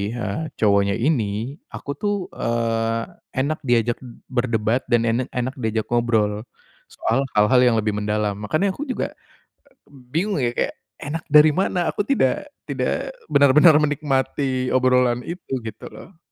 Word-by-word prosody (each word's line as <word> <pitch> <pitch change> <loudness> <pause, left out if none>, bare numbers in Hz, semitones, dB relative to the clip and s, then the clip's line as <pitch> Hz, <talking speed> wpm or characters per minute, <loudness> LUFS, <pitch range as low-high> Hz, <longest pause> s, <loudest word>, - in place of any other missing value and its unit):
eee, 120 +6 -3
cowoknya 100 -2 +2
ini, 115 0 -1
aku 140 - -7
tuh, 205 -1 0 0.2
eee, 115 -1 -1 0.3
enak 145 +4 0
diajak 120 -1 +2 0.3
berdebat 120 -1 0
dan 120 -1 +2
en 115 +1 +1 0.2
enak 125 +1 -1
diajak 110 -2 -1
ngobrol, 110 -2 +1 0.4
soal 135 +4 -1
hal-hal 105 +4 +5
yang 125 -2 +4
lebih 110 -1 +1
mendalam. 105 0 -1
Makanya 155 - 0
aku 295 +10 -6
juga 255 - -2 0.7
bingung 145 +7 -3
ya, 120 - +2
kayak, - - 0 0.2
"Enak 155 +3 -5
dari 150 +1 +7
mana? 180 0 0
Aku - - -1
tidak 270 +7 0 0.2
tidak - - -2 0.2
benar-benar 150 +3 +6
menikmati 135 -3 0
obrolan 125 -1 +3
itu," 170 +1 -7
gitu 110 -1 -8
loh. 180 -3 -13
125 Hz, 135 wpm, -22 LUFS, 115-150 Hz, 0.7 s, dari